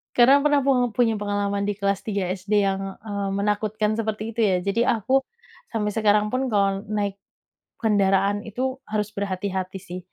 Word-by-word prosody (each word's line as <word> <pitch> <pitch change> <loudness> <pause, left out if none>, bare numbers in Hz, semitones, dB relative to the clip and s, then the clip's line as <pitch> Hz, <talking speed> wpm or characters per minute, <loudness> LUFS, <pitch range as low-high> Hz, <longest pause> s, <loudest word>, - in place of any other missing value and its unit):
Karena 270 +4 +6
pernah 290 -1 +4
pung 255 -3 +2
punya 225 0 +2
pengalaman 205 -1 -1
di 205 - 0
kelas 200 -1 0
3 200 -4 -2
SD 200 +2 +1
yang, 195 0 -3
eee, 200 -2 -3
menakutkan 210 +2 0
seperti 220 0 -3
itu - - -6
ya, 195 -3 +3
jadi 200 +5 0 0.2
aku 265 +5 +2 0.5
sampai 215 -2 -1
sekarang 210 -1 +3
pun 255 +3 -1
kalau 195 -1 +1
naik 205 -2 -2 0.6
kendaraan 200 -2 +2
itu 260 +4 -3
harus 210 -1 -2
berhati-hati 190 -1 -3
sih. 180 -1 -7
205 Hz, 160 wpm, -24 LUFS, 200-220 Hz, 0.6 s, Karena